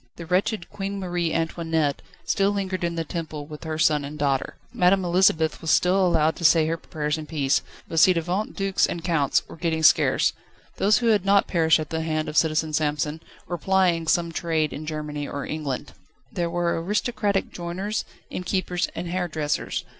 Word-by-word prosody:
The 170 - -8
wretched 180 +2 0
Queen 200 0 -4
Marie 175 -3 -1
Antoinette 160 -3 -1 0.2
still 195 0 +2
lingered 195 -3 -2
in 170 0 -1
the 165 - -1
Temple 155 -3 -5
with 150 +1 -10
her 160 -1 -3
son 150 -2 +3
and 145 +2 -7
daughter. 140 -2 0 0.2
Madame 190 -4 +3
Elisabeth 170 -3 +2
was 160 - -4
still 185 +4 +4
allowed 160 -3 +3
to - - -7
say 160 -1 +5
her 160 +1 0
prayers 155 -1 -3
in 155 - -8
peace, 140 -4 +1 0.3
but 165 - 0
ci 185 - +7
devant 180 +5 -2
dukes 195 -1 +1
and 170 - -5
counts 155 -6 +1
were - - -10
getting 160 -1 -1
scarce: 155 - +4 0.4
those 205 +2 +4
who 235 -2 +1
had 210 -4 +3
not 200 0 +4
perished 160 -2 +3
at 155 -2 -5
the 160 0 -1
hand 155 -1 -1
of - - -5
Citizen 155 -1 +2
Samson 150 +1 -1 0.3
were 175 -1 -4
plying 180 -3 +2
some 170 0 +2
trade 160 -2 -1
in 155 +1 -7
Germany 150 -2 -4
or 140 - -5
England. 150 -4 -4 0.4
There 170 -1 -2
were 170 -1 0
aristocratic 210 0 0
joiners, 185 +5 -3 0.3
innkeepers, 180 -1 -1
and 170 +1 -4
hairdressers. 170 -4 -2
165 Hz, 185 wpm, -24 LUFS, 155-185 Hz, 0.4 s, ci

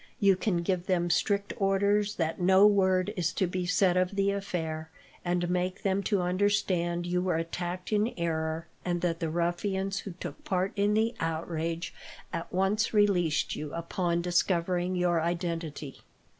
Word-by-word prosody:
You 200 -2 +5
can 180 -2 0
give 180 0 -1
them 175 -2 +1
strict 200 +3 +1
orders 200 +1 +2
that 165 0 -2
no 190 +2 +6
word 190 -1 +3
is 170 -3 0
to 190 - +1
be 180 0 -2
said 180 0 +3
of 185 +2 +1
the 200 0 +2
affair, 160 -5 -3 0.3
and 175 0 0
make 180 +1 -1
them 195 0 +1
to 200 -4 +2
understand 180 -2 +1
you 180 0 0
were 180 -2 0
attacked 175 +4 -3
in 210 +3 +2
error, 160 -1 -1 0.2
and 175 -1 -1
that 170 -2 0
the 165 - -1
ruffians 190 +4 -1
who 195 - -7
took 175 - -8
part 185 0 0
in 205 +1 +2
the 225 +2 +2
outrage 165 +1 -2 0.4
at 165 0 -4
once 200 +4 +1
released 180 -7 +2
you, 150 -1 -5
upon 170 0 -1
discovering 180 0 +1
your 175 -2 +2
identity." 165 -4 -3
180 Hz, 160 wpm, -29 LUFS, 170-195 Hz, 0.4 s, no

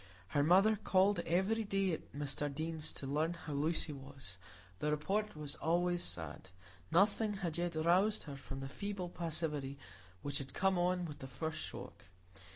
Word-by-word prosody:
Her 145 - +2
mother 195 +8 +6
called 195 -1 +4
every 190 +7 +2
day 195 -3 +1
at 160 - -5
Mr 145 0 -2
Deane's 155 +1 -3
to - - -6
learn 155 +5 +1
how 160 -3 -6
Lucy 155 +2 +1
was; 135 -9 -8 0.4
the 150 - +1
report 195 +8 0
was 150 -2 -2
always 175 +2 +2
sad,—nothing 95 - 0
had 175 -4 -2
yet 175 -1 -1
roused 180 +7 +3
her 145 -2 -6
from 135 0 -7
the 135 - -4
feeble 195 +4 -4
passivity 155 -5 -2 0.5
which 145 - 0
had 135 -1 -7
come 190 -1 +3
on 180 0 +2
with 150 -3 -7
the 135 - -6
first 155 +5 -3
shock. - - -7
160 Hz, 160 wpm, -36 LUFS, 140-185 Hz, 0.5 s, mother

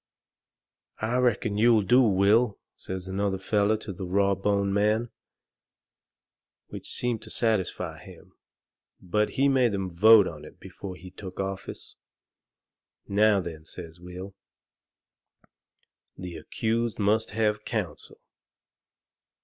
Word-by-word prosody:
"I 115 +3 -1
reckon 110 -4 +1
you'll 115 -2 +5
do, 125 +7 +5
Will," 105 +1 +3 0.2
says 95 0 -7
another 95 0 -1
feller 105 +2 +1
to 105 -2 -7
the 90 +1 -6
raw 100 +2 +2
boned 100 0 0
man, 105 +3 +1 1.6
which - - -9
seemed 120 -3 -2
to - - -11
satisfy 110 -5 -1
him. - - -15 0.7
But 105 +4 -1
he 135 +1 +4
made 130 -6 +3
'em 95 -2 -3
vote 105 +3 +7
on - - -8
it - - -13
before 95 -2 -8
he 90 +1 -12
took 95 -1 -10
office. 95 0 -5 1.1
"Now 105 0 +3
then," 80 -3 -7
says 85 +1 -10
Will, 90 +2 -9 1.8
"the 90 -2 -7
accused 115 +7 -2
must 105 +1 +1
have 105 -2 +1
counsel." - - -5
100 Hz, 115 wpm, -27 LUFS, 95-110 Hz, 1.8 s, vote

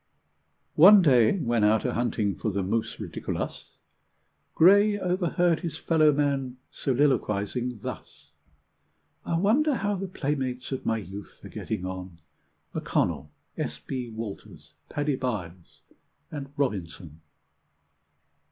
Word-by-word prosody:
One 195 +4 +9
day, 125 - +5
when 120 - 0
out 105 +1 +3
a - - 0
hunting 115 -4 0
for 110 - -3
the 100 -1 -1
mus 110 +4 -2
ridiculus, - - -5 0.8
Gray 205 +4 +6
overheard 180 -2 +1
his 165 -4 -5
fellow 155 -2 +3
man 140 -3 -1
soliloquising 125 -4 0
thus: - - -8 1.0
"I 165 - +1
wonder 260 - +3
how 205 -3 -1
the 195 +1 -4
playmates 135 -7 -3
of 130 - -4
my 115 - +2
youth 100 -1 -9
are - - -8
getting 90 - -4
on, 95 -2 -6 0.6
M'Connell, 75 +2 -1 0.3
S. 75 0 -3
B. 125 - -5
Walters, 110 -2 -8 0.2
Paddy 145 -2 -1
Byles, 95 -9 -5 0.5
and 140 -2 -6
Robinson?" 90 - -3
130 Hz, 115 wpm, -27 LUFS, 105-160 Hz, 1.0 s, One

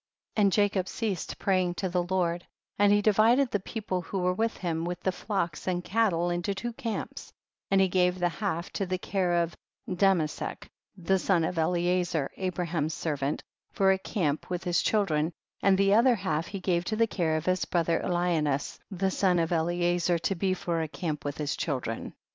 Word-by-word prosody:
24. 215 - +1
And 200 - +4
Jacob 200 -2 +2
ceased 205 -7 -3
praying 185 -2 +1
to 190 - -2
the 180 0 0
Lord, 175 -1 0 0.4
and 205 0 +5
he 205 0 +4
divided 230 +5 +4
the 205 - +1
people 195 -2 -3
that 165 - -15
were 180 0 +1
with 225 +4 -1
him 165 -2 -2
with 175 0 -3
the 190 - +1
flocks 185 -5 -3
and 180 -1 0
cattle 185 -6 +1
into 175 +3 -1
two 240 +4 -4
camps, 225 -1 -5 0.4
and 195 - +4
he 190 - +5
gave 180 0 +2
the 180 -1 +2
half 175 -2 -3
to 195 - -2
the 185 0 -1
care 180 -2 +1
of 170 - -6 0.3
Damesek, 180 -4 0 0.3
the 190 +2 +1
son 180 -3 +2
of 170 +1 -1
Eliezer 175 -2 +1
Abraham's 170 -4 -2
ser 160 -3 -2
vant, 140 +1 -2 0.3
for 195 -1 +4
a 190 - +1
camp, 155 -7 -2
with 180 0 -3
his 175 -2 +2
children, 165 -7 +1 0.3
and 195 -1 +4
the 195 0 +4
other 235 +3 +5
half 185 -5 -2
he 195 - -5
gave 180 -2 0
to 215 - -1
the 230 +1 +4
care 165 -7 0
of 155 - -4
his 185 0 +1
brother 170 -1 +1
Eliaims 165 -6 0
the 190 -1 -1
son 185 -2 +2
of 165 0 0
Eliezer, 175 +1 +1
to 170 +4 -1
be 185 +1 0
for 170 -2 -2
a 160 - -2
camp 155 -1 -4
with 145 -1 -4
his 150 -1 -2
children. 125 -7 -3
180 Hz, 195 wpm, -28 LUFS, 170-195 Hz, 0.4 s, and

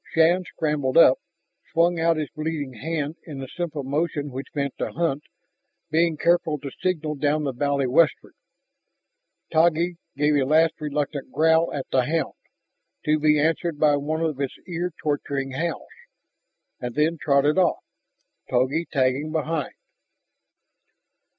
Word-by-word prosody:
Shann 170 +3 +4
scrambled 150 -6 -1
up, 130 -6 +7 0.5
swung 170 +1 +2
out 165 0 +2
his 155 -2 -3
bleeding 155 -4 -4
hand 150 +5 -3
in 150 -4 -7
the 135 0 -6
simple 155 -1 -4
motion 145 +1 -2
which 130 +1 -6
meant 140 -2 -1
to - - -2
hunt, 155 -3 -1 0.7
being 165 0 +2
careful 170 -2 +2
to 140 -1 -7
signal 160 -4 -1
down 150 +1 0
the 140 - -1
valley 140 +1 0
westward. 145 +5 +2 1.2
Taggi 170 +2 +3 0.2
gave 150 +1 +3
a 140 - +3
last 155 +4 +4
reluctant 145 -1 -3
growl 160 +1 +3
at 140 -2 -4
the 130 -2 +3
hound, 160 +4 -1 0.7
to 155 0 +2
be 150 0 +4
answered 160 +1 0
by 150 -1 +4
one 155 +3 -2
of 155 -4 -1
its 135 - -2
ear 175 0 -2
torturing 140 -2 -2
howls, 165 +5 -3 0.9
and 120 -1 -5
then 155 +2 +1
trotted 145 +4 +3
off, 180 - +2 0.7
Togi 130 +7 +1
tagging 135 +2 +1
behind. 160 -2 -2
150 Hz, 140 wpm, -24 LUFS, 140-165 Hz, 1.2 s, up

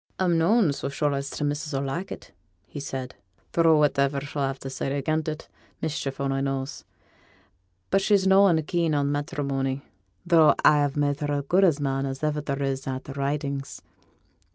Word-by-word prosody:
'A'm 180 -2 +2
noan 175 0 +3
so 140 - -4
sure 145 +1 0
as 140 0 -3
t' - - -4
missus 145 +1 -2
'll 135 - -1
like 170 +8 -4
it,' - - -9 0.5
said 135 -2 -5
he; 95 - -40
'tho' 165 -2 +4
whativer 140 -1 +2
she'll 140 -1 -2
ha' 135 - -8
to 135 - -8
say 135 +1 -3
again 155 +3 0
it, 155 0 -5 0.3
mischief 145 -4 -3
only 135 -1 0
knows. 135 0 -3 1.1
But 195 - +3
she's 200 -1 +3
noan 190 -4 +5
keen 165 0 0
on 140 0 +1
matterimony; 140 -2 -2 0.4
though 165 -3 +5
a - - +9
have 145 -1 +1
made 145 -1 +1
her 145 -1 -2
as 140 -1 -1
good 185 +5 +4
a 165 -6 +4
man 135 0 -1
as 135 0 -4
there 150 +2 0 0.3
is 135 0 -2
in 130 - -1
a' - - -4
t' 135 - -10
Ridings. 140 0 -3
145 Hz, 185 wpm, -25 LUFS, 135-160 Hz, 1.1 s, a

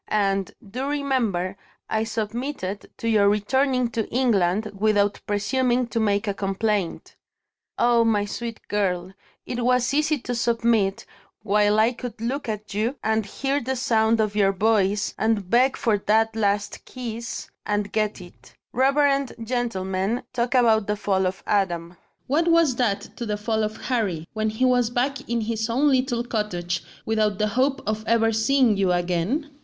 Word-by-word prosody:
And, 195 -2 0 0.2
do 255 +7 -4
remember, 240 -11 -1 0.3
I 220 0 0
submitted 220 -2 -4
to 230 - -4
your 210 -3 +4
returning 250 +4 +1
to 225 -2 -2
England, 215 -4 +1
without 205 0 +1
presuming 245 +4 +1
to 230 - -1
make 205 -1 +1
a 200 - 0
complaint. 195 -1 -2 0.6
Ah, 235 -1 +4
my 210 -3 +2
sweet 230 +2 -6
girl, 185 -3 -1 0.3
it 245 -1 -3
was 250 +1 +2
easy 300 +1 +2
to 245 -1 -5
submit, 230 -4 +1 0.4
while 210 +1 +3
I 225 +2 +4
could 245 -2 -7
look 250 +3 -3
at 210 -1 -5
you, 220 +6 0
and 220 -1 0
hear 275 +6 -1
the 265 +2 -2
sound 225 -2 +2
of 215 -1 0
your 200 -2 +4
voice, 205 0 +1
and 220 -4 +1
beg 250 +6 +3
for 215 -3 +1
that 220 +2 +2
last 205 -1 -1
kiss 235 -2 -6
and 205 -1 -1
get 215 -1 -1
it. 175 - -16 0.2
Reverend 275 +1 +2
gentlemen 220 -3 -1
talk 245 +1 0
about 225 -4 +4
the 210 - 0
fall 190 -2 0
of 185 +1 -5
Adam. 175 -4 0 0.3
What 315 +6 +1
was 330 -6 +4
that 220 -6 -1
to 235 - -4
the 210 -1 -1
fall 220 +1 -1
of 215 +1 -3
Harry, 195 -11 -2
when 220 0 0
he 220 +4 0
was 245 -2 +3
back 265 +2 -2
in 235 -1 0
his 220 0 -2
own 270 +6 +3
little 255 -2 +1
cottage, 180 -7 -2 0.2
without 215 -2 +1
the 215 0 +1
hope 265 +5 0
of 215 +1 -2
ever 225 0 +3
seeing 225 +1 +3
you 190 -2 +2
again? 180 - -1
220 Hz, 160 wpm, -24 LUFS, 205-245 Hz, 0.6 s, your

